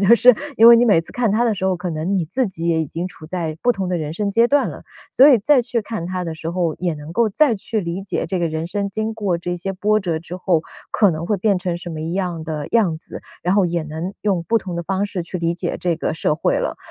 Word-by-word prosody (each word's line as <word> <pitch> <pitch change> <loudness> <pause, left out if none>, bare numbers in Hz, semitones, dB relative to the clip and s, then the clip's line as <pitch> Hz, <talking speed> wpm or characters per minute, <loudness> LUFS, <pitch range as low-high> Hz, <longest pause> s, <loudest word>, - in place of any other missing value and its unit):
就 205 +4 +7
是 250 +1 +6 0.2
因 230 +1 +8
为 235 - +10
你 235 - +4
每 205 -8 +4
次 165 - -13
看 235 -4 0
它 230 +3 +2
的 230 - +2
时 190 -2 -4
候， 190 -1 +1
可 180 0 -4
能 165 +5 -1
你 175 - 0
自 255 - -1
己 170 -3 -4
也 160 -1 +2
已 155 - -2
经 170 +5 -4
处 160 -3 -12
在 165 -2 -3
不 245 - +3
同 190 -3 -3
的 180 -1 -1
人 155 -1 -4
生 200 +3 -2
阶 230 +3 +4
段 285 +3 +2
了。 - - -11 0.3
所 270 +3 +7
以 270 - +7
再 275 +4 +4
去 235 -1 -2
看 205 -6 -5
它 185 0 -3
的 165 - -4
时 160 +1 -6
候， 170 -2 -1
也 175 -2 -1
能 150 +2 -9
够 230 +3 +2
再 235 +2 +3
去 215 +2 -3
理 170 +1 -4
解 - - -2
这 190 - -2
个 170 - +1
人 160 +1 -3
生 200 +1 -2
经 220 +3 -3
过 200 -5 -1
这 175 +1 -4
些 195 +2 -3
波 210 +3 +1
折 175 -5 -2
之 175 +2 -7
后 175 -3 +1 0.3
可 205 -4 +4
能 160 +1 -4
会 210 +1 +1
变 200 0 +1
成 180 -1 -2
什 175 0 -8
么 155 -1 -6
样 170 0 -3
的 155 -2 -4
样 200 -9 +2
子， 160 - -10 0.2
然 180 - +1
后 195 -2 +3
也 170 -1 -1
能 160 +5 -5
用 190 -5 0
不 230 +6 +1
同 185 -4 -6
的 170 - -2
方 195 +3 -1
式 180 -4 -4
去 180 - -5
理 165 0 0
解 175 0 -3
这 175 -2 0
个 - - -2
社 155 -1 0
会 - - +1
了。 - - -2
180 Hz, 310 characters per minute, -20 LUFS, 165-210 Hz, 0.3 s, 为